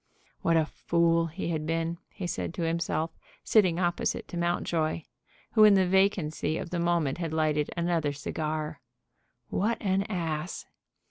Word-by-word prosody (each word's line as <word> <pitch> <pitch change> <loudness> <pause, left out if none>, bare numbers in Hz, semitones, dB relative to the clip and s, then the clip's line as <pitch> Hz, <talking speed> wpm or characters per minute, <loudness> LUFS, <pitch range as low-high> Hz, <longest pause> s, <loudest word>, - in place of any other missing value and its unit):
"What 165 0 +3
a 160 - +3
fool 170 +1 +1
he 170 +2 -4
had 155 -2 -2
been," 165 +1 -1
he 185 - -6
said 175 - -3
to 170 - -2
himself, 165 -1 -1 0.3
sitting 185 -6 +4
opposite 175 -1 0
to - - -7
Mountjoy, 170 -2 0 0.5
who 215 - +6
in 210 -1 +8
the 190 -1 +4
vacancy 180 -5 +1
of 175 - -5
the 175 - -1
moment 170 -4 +1
had 165 -3 -2
lighted 155 -2 +1
another 170 -3 +1
cigar; 155 +1 -3 0.7
"what 220 +5 0
an 195 -2 +1
ass!" 165 -3 -3
170 Hz, 150 wpm, -28 LUFS, 155-175 Hz, 0.7 s, in